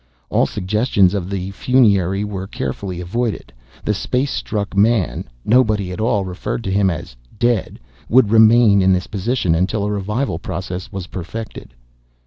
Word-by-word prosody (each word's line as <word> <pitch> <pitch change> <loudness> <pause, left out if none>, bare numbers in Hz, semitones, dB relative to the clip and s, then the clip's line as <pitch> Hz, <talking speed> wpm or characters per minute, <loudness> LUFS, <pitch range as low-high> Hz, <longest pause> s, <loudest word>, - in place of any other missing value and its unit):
All - - +3
suggestions 100 -1 +1
of 95 -3 -3
the 95 -1 -3
funerary 100 -5 +2
were 95 -2 -5
carefully 90 +5 -4
avoided. 100 - -3 0.3
The 105 - +1
space 125 +7 -1
struck 100 -2 -3
man 100 - +2 0.2
nobody 110 -5 +2
at 90 - -5
all 105 -3 +1
referred 95 +5 -4
to 95 - -3
him 100 0 +3
as 85 -7 -6 0.2
"dead" 120 -2 0 0.3
would 120 -3 +4
remain 110 -2 +6
in 95 0 +4
this 90 -1 0
position 105 -3 -1
until 100 +5 0
a 105 - -1
revival 105 0 -2
process 90 +1 -5
was 95 -2 -5
perfected. 95 - -8
100 Hz, 150 wpm, -19 LUFS, 95-110 Hz, 0.3 s, remain